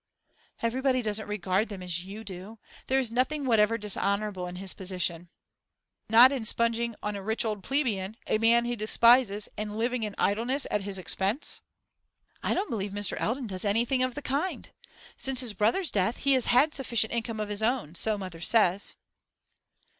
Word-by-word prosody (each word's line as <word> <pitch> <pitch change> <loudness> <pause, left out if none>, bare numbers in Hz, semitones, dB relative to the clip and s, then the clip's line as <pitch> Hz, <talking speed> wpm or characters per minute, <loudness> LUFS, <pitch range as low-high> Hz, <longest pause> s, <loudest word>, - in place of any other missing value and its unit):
'Everybody 255 +2 +1
doesn't 215 0 -2
regard 205 +1 -1
them 195 -3 -7
as 175 -1 -2
you 200 +4 -9
do. 195 +2 -9 0.3
There 265 - +2
is 255 -4 +1
nothing 270 +4 0
whatever 225 -2 +3
dishonourable 200 -2 -1
in 180 - -7
his 190 +1 -1
position.' 180 -2 -3 0.8
'Not 235 +4 +8
in 265 -4 -3
sponging 235 +1 0
on 210 0 -2
a 200 - -5
rich 220 +4 -1
old 210 -2 -2
plebeian, 225 -7 -1
a 215 - 0
man 235 +1 +4
he 240 0 -2
despises, 220 -1 +3
and 210 0 -4
living 240 +2 -1
in 210 -2 -3
idleness 240 +7 +1
at 210 - 0
his 195 0 -4
expense?' 195 - -1 0.8
'I - - 0
don't 390 - -2
believe 205 -3 -3
Mr. 205 -1 0
Eldon 250 +4 -1
does 190 -4 -2
anything 235 +5 +1
of 255 -1 0
the 295 - -6
kind. 285 +8 -3 0.5
Since 265 -1 +2
his 240 -4 -1
brother's 230 - +1
death 200 +4 0
he 275 0 +2
has 255 -2 +2
had 265 +6 +4
a - - -5
sufficient 235 -5 +1
income 230 -1 -3
of 210 -1 -3
his 205 0 -1
own, 225 - 0
so 215 +4 +1
mother 185 -4 -8
says. 200 -1 +2
220 Hz, 180 wpm, -28 LUFS, 200-245 Hz, 0.8 s, Not